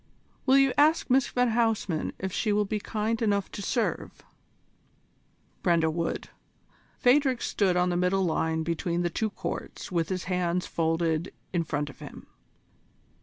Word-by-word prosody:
"Will 265 +1 +6
you 270 -2 +4
ask 305 -2 +3
Miss 265 0 +4
van 245 -1 +1
Huysman 220 -8 0
if 190 0 -4
she 215 - 0
will 205 0 +2
be 210 +2 -2
kind 220 +2 -2
enough 200 -3 +1
to - - -6
serve?" 230 +3 -2 1.4
Brenda 165 -3 +2
would. 165 +1 -3 0.7
Phadrig 260 -1 +3
stood 190 -3 +1
on 180 0 +2
the 175 - 0
middle 180 +2 +2
line 160 -1 0
between 170 +1 -1
the 175 - -1
two 220 +4 -1
courts 200 - -6
with 170 -2 0
his 185 -1 -2
hands 180 -1 -1
folded 165 +1 0 0.2
in 170 -2 +1
front 145 -2 -3
of - - -21
him. - - -10
185 Hz, 155 wpm, -27 LUFS, 170-225 Hz, 1.4 s, Will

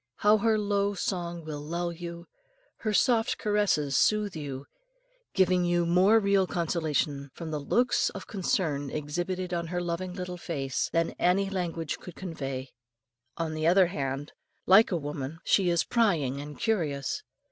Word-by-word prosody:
How 210 +1 +4
her 220 +1 +3
low 205 -1 0
song 175 -3 -3
will 150 -2 -5
lull 170 +3 -2
you, 170 0 -7 0.5
her 215 - -2
soft 225 +1 +2
caresses 205 -10 +1
soothe 210 -3 +2
you, 140 -3 -5 0.7
giving 185 -1 +3
you 175 0 +2
more 185 +6 +5
real 200 -2 +2
consolation 155 -5 -1
from 165 -2 -6
the 150 - -2
looks 240 - +2
of - - -8
concern 165 - -1
exhibited 175 +5 -3
on 170 -1 -2
her 180 +1 -2
loving 175 +1 -3
little 180 -1 -5
face, 140 -6 -2
than 165 0 +1
any 195 +2 +2
language 170 -4 -3
could 180 - -10
convey. 135 -7 -5 0.7
On 165 -1 -2
the 155 0 0
other 185 +2 +6
hand, 140 -4 -3 0.3
like 200 +4 +6
a 175 - +1
woman, 145 0 -5
she 190 -3 +3
is 170 -1 +2
prying 160 - +1
and 145 0 -8
curious. 160 - -1
175 Hz, 155 wpm, -28 LUFS, 150-195 Hz, 0.7 s, other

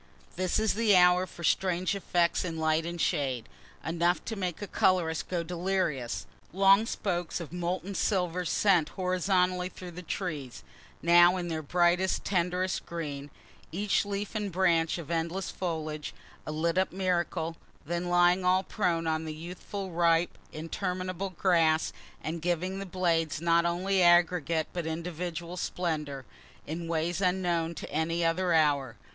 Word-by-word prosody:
_ - - -20
This 185 0 0
is 220 -1 +2
the 215 -1 +3
hour 180 0 +5
for 170 - -11
strange 185 +1 +1
effects 175 -3 +1
in 165 -3 -4
light 160 +1 +1
and 170 0 -5
shade 135 -9 0 0.4
enough 170 +2 +1
to 225 - -3
make 180 -4 -3
a 205 - -4
colorist 180 -4 +1
go 175 -2 -1
delirious 170 -7 -2 0.3
long 195 +4 +5
spokes 175 -6 -2
of 170 -2 -8
molten 180 +2 -3
silver 180 -3 0
sent 175 -3 +3
horizontally 180 0 +1
through 180 -1 -9
the 175 +1 -8
trees 150 - -5 0.4
(now 175 +2 +6
in 175 -1 -3
their 160 -1 -2
brightest 175 +4 +2
tenderest 180 0 0
green,) 145 -4 -5 0.4
each 200 +4 +1
leaf 205 0 -4
and 210 -3 -2
branch 170 -3 +2
of 170 -2 -7
endless 170 +3 -2
foliage 155 -4 -4 0.3
a - - -2
lit 165 +3 0
up 190 - +1
miracle, 175 -3 -1 0.3
then 170 +3 -2
lying 175 +1 +4
all 185 +1 +3
prone 170 -6 -1
on 160 0 -1
the 155 -1 -5
youthful 180 +4 -6
ripe, 170 0 +2 0.2
interminable 185 +3 -3
grass, 165 -3 +2 0.3
and 165 +1 -4
giving 180 +3 -1
the 195 - -5
blades 165 -5 0
not 170 +1 +3
only 185 +3 +1
aggregate 175 -2 +4
but 175 -2 -3
individual 170 +1 -4
splendor, 150 -7 -3 0.4
in 165 +2 -5
ways 165 +2 -1
unknown 175 -3 0
to - - -7
any 165 +2 0
other 175 +2 +1
hour. 145 -6 +2
175 Hz, 150 wpm, -29 LUFS, 165-185 Hz, 0.4 s, now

